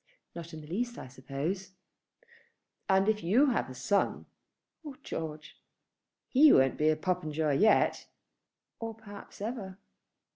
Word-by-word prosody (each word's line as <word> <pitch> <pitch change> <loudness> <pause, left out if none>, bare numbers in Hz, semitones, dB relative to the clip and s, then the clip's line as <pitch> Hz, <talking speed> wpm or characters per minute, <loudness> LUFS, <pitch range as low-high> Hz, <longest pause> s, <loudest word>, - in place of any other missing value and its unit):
"Not 170 -1 -8
in 160 - -8
the 150 - -12
least 240 +8 -3
I - - -8
suppose." 145 +9 -5 1.2
"And 190 +1 +3
if 215 -1 +1
you 250 +11 +3
have 225 - -1
a 130 - -9
son 200 +10 0 0.3
" - - -58
"Oh, 290 -3 -8
George?" 155 -1 -7 0.7
"He 290 +3 +6
won't 135 0 +4
be 155 +1 +3
Popenjoy 155 -4 -1
yet." 220 +1 +3 0.7
"Or 225 -1 -5
perhaps 205 -2 -12
ever." 205 -4 -5
185 Hz, 135 wpm, -30 LUFS, 155-220 Hz, 1.2 s, He